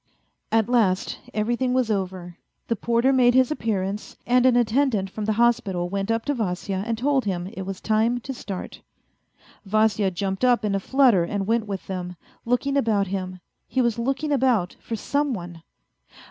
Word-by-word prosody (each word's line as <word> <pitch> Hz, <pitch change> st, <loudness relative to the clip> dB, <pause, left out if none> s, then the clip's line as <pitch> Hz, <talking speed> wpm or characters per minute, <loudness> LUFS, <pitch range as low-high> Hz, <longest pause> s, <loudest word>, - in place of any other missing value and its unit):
At 225 Hz, -1 st, +3 dB
last 215 Hz, -6 st, +1 dB
everything 240 Hz, +4 st, 0 dB
was 250 Hz, -4 st, +1 dB
over. 185 Hz, -3 st, -3 dB, 0.3 s
The 230 Hz, -, +2 dB
porter 235 Hz, +4 st, +2 dB
made 245 Hz, -2 st, +4 dB
his 260 Hz, +1 st, +4 dB
appearance, 205 Hz, -6 st, -3 dB
and 250 Hz, +1 st, +4 dB
an 250 Hz, -, +4 dB
attendant 235 Hz, -4 st, +1 dB
from 215 Hz, +1 st, -4 dB
the 215 Hz, -, +1 dB
hospital 200 Hz, -7 st, +1 dB
went 195 Hz, +2 st, -2 dB
up 225 Hz, 0 st, 0 dB
to 290 Hz, -, 0 dB
Vasya 195 Hz, -4 st, -2 dB
and 230 Hz, -1 st, -1 dB
told 265 Hz, +1 st, +1 dB
him 180 Hz, -3 st, -2 dB
it 190 Hz, -1 st, -7 dB
was 195 Hz, -1 st, -5 dB
time 225 Hz, +3 st, +1 dB
to 270 Hz, -, -5 dB
start. 195 Hz, -6 st, -7 dB, 0.8 s
Vasya 215 Hz, 0 st, +2 dB
jumped 190 Hz, +3 st, -3 dB
up 245 Hz, -3 st, +3 dB
in 205 Hz, -, 0 dB
a 195 Hz, -, +1 dB
flutter 245 Hz, -4 st, +4 dB
and 195 Hz, +3 st, -2 dB
went 225 Hz, +1 st, 0 dB
with 195 Hz, -2 st, -5 dB
them, 180 Hz, -2 st, -5 dB, 0.3 s
looking 260 Hz, +4 st, +1 dB
about 220 Hz, -6 st, +2 dB
him. 185 Hz, -1 st, -4 dB, 0.3 s
He 260 Hz, -, -2 dB
was 235 Hz, -2 st, +1 dB
looking 270 Hz, +5 st, -1 dB
about 250 Hz, -10 st, +2 dB
for 230 Hz, -, -4 dB
some 285 Hz, +4 st, -1 dB
one. 175 Hz, -3 st, -8 dB
220 Hz, 175 wpm, -24 LUFS, 195-245 Hz, 0.8 s, made